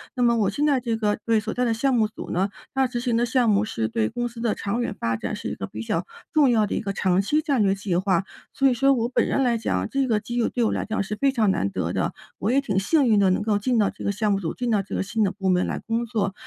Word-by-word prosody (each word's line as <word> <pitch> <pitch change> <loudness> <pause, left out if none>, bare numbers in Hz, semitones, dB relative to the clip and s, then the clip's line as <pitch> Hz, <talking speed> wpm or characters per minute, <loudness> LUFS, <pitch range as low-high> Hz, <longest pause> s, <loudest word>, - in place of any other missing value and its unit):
那 250 - -2
么 235 -1 +4
我 205 -3 +2
现 290 +8 0
在 275 -3 +3
这 235 -2 -2
个 210 -2 0
对， 225 -1 +3
所 220 +1 -4
在 250 - 0
的 230 - +1
项 260 +3 +1
目 220 -2 +3
组 220 - -9
呢， 190 +3 +1 0.2
大 265 0 +2
致 245 -1 -3
性 240 -2 0
的 240 - +2
项 240 -1 +2
目 210 +1 +3
是 110 - -2
对 110 -1 0
公 240 0 -2
司 235 0 -11
的 230 -2 0
长 210 +5 -2
远 235 - -2
发 115 0 0
展， - - -4
是 - - -5
一 - - -4
个 - - -5
比 105 +3 -7
较 165 +10 -2 0.3
重 300 -4 +4
要 220 -2 +3
的 - - -3
一 - - 0
个 200 -2 -3
长 190 -1 +2
期 300 +10 +1
战 280 -7 +1
略 195 -1 +3
计 195 -2 -2
划。 185 0 +1 0.3
所 275 -1 +3
以 - - +2
说 275 +3 +3
我 235 -2 0
本 255 - +1
人 - - 0
来 240 -2 +2
讲， 95 - -1
这 275 -1 0
个 220 -3 +2
机 240 +3 -5
遇 235 - +2
对 245 - -1
我 220 - +2
来 - - -2
讲， 220 -1 -2
是 210 +2 -3
非 275 +4 +2
常 225 -6 +2
难 100 - 0
得 - - -2
的， - - -1 0.3
我 210 +5 0
也 275 +2 +3
挺 205 -8 -2
幸 280 +7 +2
运 220 -2 +4
的， 195 -2 +4
能 185 - +1
够 210 -1 +1
进 240 +4 0
到 205 - +3
这 - - -10
个 200 - 0
项 210 +1 0
目 195 - +1
组， 165 -5 -3
进 245 -1 -3
到 210 -3 +2
这 195 - -9
个 - - 0
新 220 +3 -1
的 195 - +1
部 195 -1 -2
门 180 0 +2
来 - - -3
工 230 +1 -2
作。 210 -4 -1
220 Hz, 345 characters per minute, -24 LUFS, 195-245 Hz, 0.3 s, 么